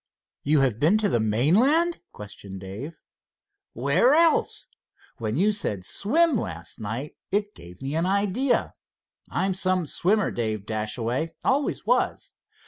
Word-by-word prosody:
"You 145 0 +3
have 125 -5 +1
been 165 +10 +4
to 215 -2 +1
the 120 - +1
mainland?" 210 - +3
questioned 100 -2 -9
Dave. 110 - -8 0.7
"Where 145 - +3
else? 330 0 +2 0.5
When 110 +1 -2
you 205 +5 +3
said 105 - -3
'swim' 310 +6 +2
last 85 - -6
night, 115 +7 -5
it 205 +1 -1
gave 90 +6 -13
me 135 +2 -3
an 165 +3 +1
idea. 205 +7 +1 0.6
I'm 190 0 0
some 185 -1 0
swimmer, 200 +7 +1
Dave 110 -3 -3
Dashaway. 115 +8 -3
Always 280 +2 0
was. - - 0
155 Hz, 135 wpm, -25 LUFS, -, 0.7 s, been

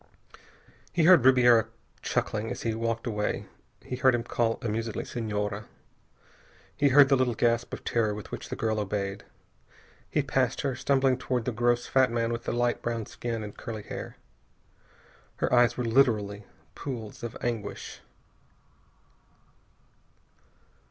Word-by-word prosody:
He 170 - +1
heard 175 -5 +7
Ribiera 120 -4 +6 0.3
chuckling 110 +1 -1
as 125 - -5
he 115 - 0
walked 115 0 -2
away. 105 -3 -2 0.4
He 125 - -5
heard 130 -1 +4
him 120 - -2
call, 115 -1 0
amusedly, 115 0 -2
"Senhora." 105 -2 -3 1.1
He 145 -1 +3
heard 140 +1 +7
the 135 - +4
little 130 -3 +1
gasp 115 +1 +1
of - - -6
terror 110 -3 0
with 105 - -9
which - - -6
the - - -3
girl 110 -1 -1
obeyed. 100 -1 -3 0.8
He - - +1
passed - - 0
her, 135 -2 -1
stumbling 135 -1 +2
toward 125 -3 -2
the 125 - 0
gross 120 +1 +1
fat 130 -1 +3
man 115 0 0
with 115 0 -4
the - - -1
light 120 0 0
brown 115 -2 -2
skin 115 0 -4
and 105 -1 -8
curly 110 -3 -6
hair. - - -7 1.2
Her - - -1
eyes 120 -1 +4
were 125 - -1
literally 110 -5 +2 0.3
pools 115 -6 -6
of 120 -1 -6
anguish. 115 -4 -4
115 Hz, 145 wpm, -28 LUFS, 110-125 Hz, 1.2 s, heard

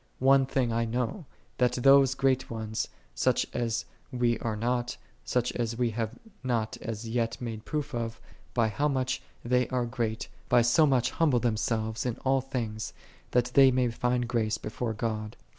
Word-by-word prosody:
3 130 - -4
One 135 0 +6
thing 125 -4 0
I 115 +1 +1
know, 125 - -2 0.3
that 125 -1 +3
those 135 +1 +5
great 135 -1 +1
ones, 110 -1 -3 0.3
such - - +2
as 115 -1 -1 0.3
we 120 -2 +1
are 115 -2 -2
not, 120 +2 -1 0.3
such 125 -1 0
as 115 -1 -2
we 120 -2 +1
have 110 -1 -3 0.3
not 115 -4 0
as 115 0 -5
yet 115 0 -1
made 115 -3 -5
proof 150 -2 -3
of, 115 -1 -3 0.4
by 115 -2 +3
how 145 +7 0
much 130 -2 -1 0.2
they 125 0 +2
are 125 -2 0
great, 115 -1 -2 0.2
by 120 -1 +5
so 135 +7 +5
much 125 -3 +2
humble 150 -7 +3
themselves 110 -1 -1
in 125 -3 -2
all 135 0 +3
things, 115 -5 -4 0.4
that 120 -1 +1
they 135 -1 +8
may 125 -2 +2
find 125 +1 0
grace 115 -2 0
before 110 +1 -3
God. 110 -1 -3
120 Hz, 175 wpm, -29 LUFS, 115-130 Hz, 0.4 s, they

